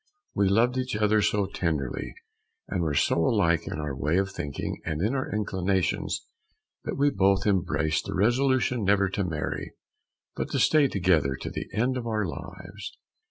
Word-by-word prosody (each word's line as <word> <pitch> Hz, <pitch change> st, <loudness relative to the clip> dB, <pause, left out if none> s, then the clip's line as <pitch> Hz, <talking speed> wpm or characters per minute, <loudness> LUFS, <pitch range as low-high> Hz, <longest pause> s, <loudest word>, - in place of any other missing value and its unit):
We 100 Hz, -1 st, +2 dB
loved 120 Hz, +6 st, +3 dB
each 130 Hz, -1 st, -2 dB
other 105 Hz, 0 st, +3 dB
so 105 Hz, -1 st, +2 dB
tenderly, 80 Hz, -9 st, -3 dB, 0.5 s
and 90 Hz, -, -2 dB
were 80 Hz, -3 st, 0 dB
so -, -, +2 dB
alike 85 Hz, -5 st, +2 dB
in -, -, -4 dB
our 75 Hz, -3 st, -3 dB
way 75 Hz, +5 st, 0 dB
of 95 Hz, 0 st, 0 dB
thinking 70 Hz, -7 st, -5 dB
and 80 Hz, -2 st, -3 dB, 0.2 s
our 130 Hz, -, -2 dB
inclinations, 95 Hz, -3 st, -1 dB, 0.6 s
that -, -, -3 dB
we 145 Hz, +1 st, +3 dB
both 95 Hz, -2 st, +2 dB
embraced 85 Hz, -6 st, +1 dB
the -, -, -4 dB
resolution 125 Hz, +2 st, +2 dB
never 100 Hz, 0 st, +3 dB
to 100 Hz, +1 st, -1 dB
marry, 80 Hz, -4 st, -4 dB, 0.6 s
but -, -, -3 dB
to -, -, +1 dB
stay 155 Hz, -3 st, +5 dB
together 85 Hz, -, +2 dB
to -, -, -6 dB
the -, -, -5 dB
end 125 Hz, +4 st, 0 dB
of 120 Hz, -2 st, -4 dB
our 110 Hz, -2 st, 0 dB
lives. 80 Hz, -, -8 dB
100 Hz, 165 wpm, -27 LUFS, 85-110 Hz, 0.6 s, stay